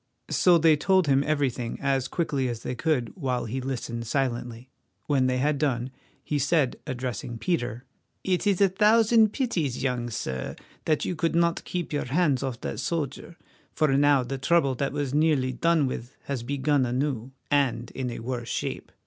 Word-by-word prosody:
So 180 Hz, -2 st, +5 dB
they 160 Hz, -1 st, +5 dB
told 185 Hz, +4 st, +3 dB
him 140 Hz, -1 st, +3 dB
everything 140 Hz, -6 st, -1 dB
as 135 Hz, -2 st, 0 dB
quickly 140 Hz, -6 st, -1 dB
as 115 Hz, -1 st, -5 dB
they -, -, -3 dB
could, 125 Hz, -2 st, 0 dB
while 130 Hz, -8 st, -2 dB
he 130 Hz, +4 st, -3 dB
listened 120 Hz, -3 st, -4 dB
silently. 120 Hz, -1 st, -2 dB, 0.3 s
When 135 Hz, -3 st, +2 dB
they 130 Hz, 0 st, +1 dB
had 145 Hz, +2 st, +1 dB
done, 130 Hz, -4 st, 0 dB, 0.3 s
he 150 Hz, -, -1 dB
said, 145 Hz, -1 st, +2 dB
addressing 120 Hz, -2 st, -4 dB
Peter: 120 Hz, -5 st, -2 dB, 0.4 s
"It 185 Hz, +1 st, 0 dB
is 195 Hz, -3 st, +2 dB
a 195 Hz, -, +6 dB
thousand 220 Hz, +2 st, +4 dB
pities, 170 Hz, -, -1 dB
young 125 Hz, -3 st, -1 dB
sir, 65 Hz, -, -4 dB, 0.3 s
that 155 Hz, -2 st, +1 dB
you 180 Hz, -, -2 dB
could 165 Hz, +1 st, 0 dB
not 170 Hz, 0 st, +2 dB
keep 175 Hz, -3 st, -4 dB
your 145 Hz, -, -1 dB
hands 145 Hz, 0 st, +1 dB
off 130 Hz, -3 st, -4 dB
that -, -, -4 dB
soldier, 165 Hz, 0 st, -3 dB, 0.4 s
for 155 Hz, -4 st, +2 dB
now 140 Hz, -1 st, +4 dB
the 135 Hz, +2 st, -4 dB
trouble 140 Hz, 0 st, +3 dB
that 135 Hz, +2 st, -2 dB
was 145 Hz, -2 st, -2 dB
nearly 150 Hz, -4 st, +2 dB
done 165 Hz, +3 st, +2 dB
with 125 Hz, -1 st, -5 dB
has 140 Hz, -4 st, -3 dB
begun 140 Hz, +2 st, +1 dB
anew, 125 Hz, -1 st, -1 dB, 0.2 s
and 125 Hz, -5 st, +1 dB
in 130 Hz, -2 st, -3 dB
a 120 Hz, -, -6 dB
worse 120 Hz, 0 st, -4 dB
shape. -, -, -4 dB
135 Hz, 175 wpm, -26 LUFS, 125-160 Hz, 0.4 s, a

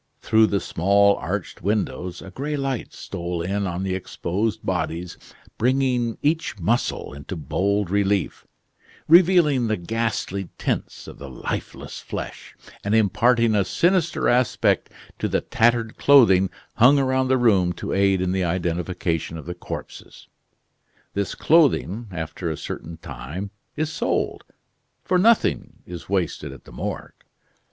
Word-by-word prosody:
Through 110 Hz, 0 st, +4 dB
the 100 Hz, -1 st, 0 dB
small 100 Hz, +4 st, +3 dB
arched -, -, -4 dB
windows 95 Hz, -3 st, -2 dB
a 95 Hz, -, -10 dB
gray 145 Hz, +7 st, -3 dB
light 135 Hz, -3 st, -3 dB
stole 85 Hz, -2 st, -5 dB
in 100 Hz, +2 st, -1 dB
on 90 Hz, +1 st, -3 dB
the 95 Hz, -1 st, -1 dB
exposed 100 Hz, +4 st, -3 dB
bodies, 85 Hz, -1 st, -2 dB, 0.4 s
bringing 125 Hz, -1 st, +1 dB
each 155 Hz, -4 st, 0 dB
muscle 105 Hz, -2 st, -1 dB
into 70 Hz, +6 st, -7 dB
bold 95 Hz, +5 st, -1 dB
relief, 100 Hz, -3 st, 0 dB, 0.6 s
revealing 165 Hz, -7 st, +5 dB
the 110 Hz, -, 0 dB
ghastly 100 Hz, -1 st, -2 dB
tints -, -, -3 dB
of -, -, -11 dB
the 70 Hz, -1 st, -8 dB
lifeless 65 Hz, -, -5 dB
flesh, -, -, -7 dB, 0.3 s
and 105 Hz, +2 st, +1 dB
imparting 115 Hz, +2 st, +3 dB
a 100 Hz, -2 st, +3 dB
sinister 175 Hz, -, +1 dB
aspect 125 Hz, 0 st, +2 dB, 0.3 s
to -, -, 0 dB
the -, -, 0 dB
tattered 115 Hz, -1 st, +1 dB
clothing 95 Hz, -10 st, +6 dB, 0.3 s
hung 125 Hz, +5 st, +7 dB
around 130 Hz, -1 st, +1 dB
the 130 Hz, 0 st, +3 dB
room 100 Hz, -8 st, +3 dB
to -, -, -5 dB
aid 95 Hz, -1 st, +3 dB
in 90 Hz, -1 st, 0 dB
the 95 Hz, 0 st, 0 dB
identification 85 Hz, -1 st, -2 dB
of 80 Hz, -, -9 dB
the 90 Hz, -, -4 dB
corpses. 90 Hz, -, -9 dB, 0.9 s
This 100 Hz, -1 st, -2 dB
clothing, 125 Hz, -, +3 dB
after 85 Hz, 0 st, -4 dB
a 80 Hz, -, -3 dB
certain 80 Hz, +1 st, -7 dB
time, 85 Hz, +8 st, -7 dB, 0.2 s
is 155 Hz, 0 st, -1 dB
sold -, -, -1 dB, 0.6 s
for 180 Hz, -, +2 dB
nothing 225 Hz, +4 st, +2 dB
is 85 Hz, -1 st, -9 dB
wasted 85 Hz, -7 st, -1 dB
at 70 Hz, -, -12 dB
the -, -, -15 dB
Morgue. -, -, -5 dB
100 Hz, 140 wpm, -23 LUFS, 90-120 Hz, 0.9 s, hung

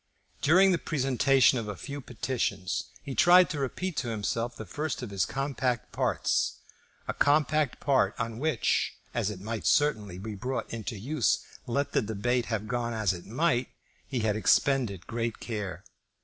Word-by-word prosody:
During 190 Hz, +6 st, +6 dB
the 175 Hz, -, +2 dB
presentation 135 Hz, -2 st, +3 dB
of 110 Hz, -, -5 dB
a 105 Hz, -, -4 dB
few 140 Hz, +7 st, -6 dB
petitions 110 Hz, -6 st, -2 dB, 0.2 s
he 140 Hz, -, -5 dB
tried 180 Hz, +4 st, +6 dB
to 150 Hz, -, -3 dB
repeat 165 Hz, +6 st, -3 dB
to 125 Hz, -, -1 dB
himself 115 Hz, +2 st, -2 dB
the 110 Hz, -, -7 dB
first 150 Hz, -, -3 dB
of 115 Hz, -, -6 dB
his 100 Hz, -1 st, 0 dB
compact 130 Hz, -3 st, -2 dB
parts, -, -, 0 dB, 0.5 s
a -, -, -1 dB
compact 150 Hz, -1 st, +2 dB
part 140 Hz, -2 st, +2 dB
on 115 Hz, 0 st, -3 dB
which, 150 Hz, -5 st, +1 dB, 0.2 s
as 115 Hz, -4 st, 0 dB
it 105 Hz, -3 st, -6 dB
might 110 Hz, +3 st, -4 dB
certainly 105 Hz, -11 st, +2 dB
be 105 Hz, +3 st, -6 dB
brought 125 Hz, +6 st, -4 dB
into 110 Hz, -1 st, -4 dB
use 130 Hz, -, +1 dB, 0.2 s
let 140 Hz, +4 st, 0 dB
the -, -, +2 dB
debate 115 Hz, +3 st, 0 dB
have 110 Hz, -1 st, -2 dB
gone 120 Hz, 0 st, -1 dB
as 105 Hz, -4 st, +1 dB
it 90 Hz, -1 st, -9 dB
might, 125 Hz, +1 st, +1 dB, 0.4 s
he 130 Hz, -4 st, -2 dB
had 110 Hz, -1 st, +1 dB
expended 110 Hz, -, +2 dB
great 115 Hz, -1 st, -3 dB
care. 105 Hz, -5 st, -5 dB
120 Hz, 165 wpm, -29 LUFS, 110-140 Hz, 0.5 s, During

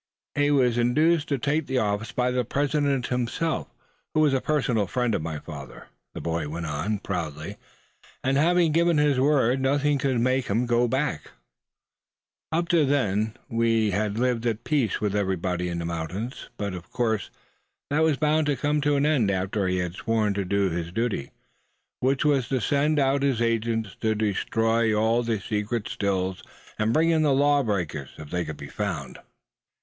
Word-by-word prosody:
"He 145 Hz, 0 st, +2 dB
was 125 Hz, -4 st, +3 dB
induced 150 Hz, +7 st, +3 dB
to 140 Hz, -, 0 dB
take 145 Hz, +4 st, 0 dB
the 130 Hz, -, -1 dB
office 105 Hz, 0 st, -1 dB
by 125 Hz, +1 st, 0 dB
the 125 Hz, 0 st, +1 dB
President 140 Hz, +1 st, 0 dB
himself, 125 Hz, +7 st, -1 dB, 0.5 s
who 155 Hz, -, +4 dB
was 150 Hz, -3 st, +4 dB
a 130 Hz, -, +1 dB
personal 125 Hz, -9 st, +1 dB
friend 125 Hz, +2 st, 0 dB
of -, -, 0 dB
my 80 Hz, -1 st, -4 dB
father," 70 Hz, -5 st, -10 dB, 0.3 s
the -, -, -4 dB
boy 80 Hz, -2 st, -2 dB
went 85 Hz, +2 st, -4 dB
on, 80 Hz, +8 st, -2 dB
proudly; 85 Hz, -1 st, -5 dB, 0.7 s
"and 135 Hz, +1 st, +1 dB
having 170 Hz, +3 st, +3 dB
given 170 Hz, +1 st, +3 dB
his 145 Hz, -3 st, +3 dB
word, 135 Hz, -2 st, +3 dB
nothing 145 Hz, +2 st, +2 dB
could 130 Hz, -2 st, +1 dB
make 130 Hz, +2 st, +1 dB
him 115 Hz, +5 st, +1 dB, 0.2 s
back 135 Hz, +5 st, -1 dB, 1.2 s
out. 165 Hz, +2 st, +1 dB
Up -, -, -10 dB
to 170 Hz, -3 st, +4 dB
then 110 Hz, -5 st, 0 dB
we 115 Hz, -3 st, +1 dB
had 105 Hz, +2 st, -1 dB
lived 120 Hz, -1 st, 0 dB
at 115 Hz, 0 st, -2 dB
peace 140 Hz, -8 st, 0 dB
with 105 Hz, -1 st, -1 dB
everybody 90 Hz, -3 st, -1 dB
in 85 Hz, -, -3 dB
these 85 Hz, 0 st, -3 dB
mountains; 85 Hz, +9 st, -5 dB
but 100 Hz, -2 st, -3 dB
of 85 Hz, -1 st, -8 dB
course 110 Hz, -4 st, -1 dB, 0.6 s
that 150 Hz, +2 st, +2 dB
was 160 Hz, -3 st, +3 dB
bound 155 Hz, 0 st, +2 dB
to 145 Hz, -, +2 dB
come 150 Hz, +2 st, 0 dB
to 145 Hz, 0 st, +2 dB
an 140 Hz, +1 st, +2 dB
end 140 Hz, -9 st, +2 dB
after 95 Hz, +1 st, -1 dB
he 90 Hz, 0 st, 0 dB
had 90 Hz, -1 st, -2 dB
sworn 110 Hz, +1 st, 0 dB
to 100 Hz, 0 st, -1 dB
do 100 Hz, 0 st, +1 dB
his 85 Hz, 0 st, -3 dB
duty; 115 Hz, -, -2 dB, 0.7 s
which 130 Hz, +3 st, +1 dB
was 140 Hz, -5 st, +2 dB
to 130 Hz, -, +1 dB
send 145 Hz, +4 st, +1 dB
out 135 Hz, 0 st, +2 dB
his 135 Hz, -4 st, +1 dB
agents 115 Hz, -2 st, 0 dB
to 110 Hz, -1 st, +1 dB
destroy 110 Hz, +2 st, +1 dB
all 110 Hz, +2 st, +2 dB
the 115 Hz, -3 st, -1 dB
secret 105 Hz, +2 st, -2 dB
Stills, 95 Hz, -2 st, -1 dB, 0.4 s
and 110 Hz, +1 st, +2 dB
bring 160 Hz, +6 st, +3 dB
in 160 Hz, -1 st, +3 dB
the 145 Hz, -3 st, +3 dB
law 145 Hz, +1 st, +4 dB
breakers, 85 Hz, -, -2 dB
if 75 Hz, -1 st, -10 dB
they 90 Hz, -1 st, 0 dB
could 80 Hz, -3 st, -6 dB
be 70 Hz, -, -8 dB
found." 80 Hz, -9 st, -4 dB
115 Hz, 185 wpm, -25 LUFS, 100-140 Hz, 1.2 s, who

